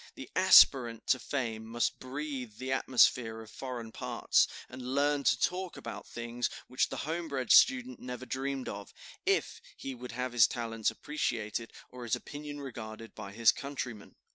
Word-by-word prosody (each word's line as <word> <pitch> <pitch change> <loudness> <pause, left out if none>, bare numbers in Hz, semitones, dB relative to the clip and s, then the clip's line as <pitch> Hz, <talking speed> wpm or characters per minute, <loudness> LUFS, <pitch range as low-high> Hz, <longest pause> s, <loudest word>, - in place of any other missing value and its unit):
The - - -9
aspirant 120 -4 +6
to 130 - +4
fame 115 -6 -3
must 115 +1 -1
breathe 130 -4 -5
the 130 0 -4
atmosphere 125 -3 +3
of 110 - -12
foreign 125 -4 -6
parts, - - +2 0.2
and 130 +1 -9
learn 145 0 +2
to - - +4
talk 185 0 -1
about - - -7
things 120 +1 -3 0.2
which 130 - 0
the - - -5
homebred 155 -5 -2
student 255 -1 +5
never 125 0 -6
dreamed 135 0 -3
of, 100 0 -7 0.3
if - - +1 0.2
he 135 - -5
would 125 -1 -8
have 125 +1 -3
his 120 -2 +7
talents 115 -3 -1
appreciated 115 -6 -3 0.2
or 125 - -10
his 120 -2 0
opinion 145 0 -7
regarded 115 -4 -8
by 100 -2 -8
his 115 +2 +5
countrymen. 130 -7 -6
125 Hz, 160 wpm, -31 LUFS, 115-140 Hz, 0.3 s, his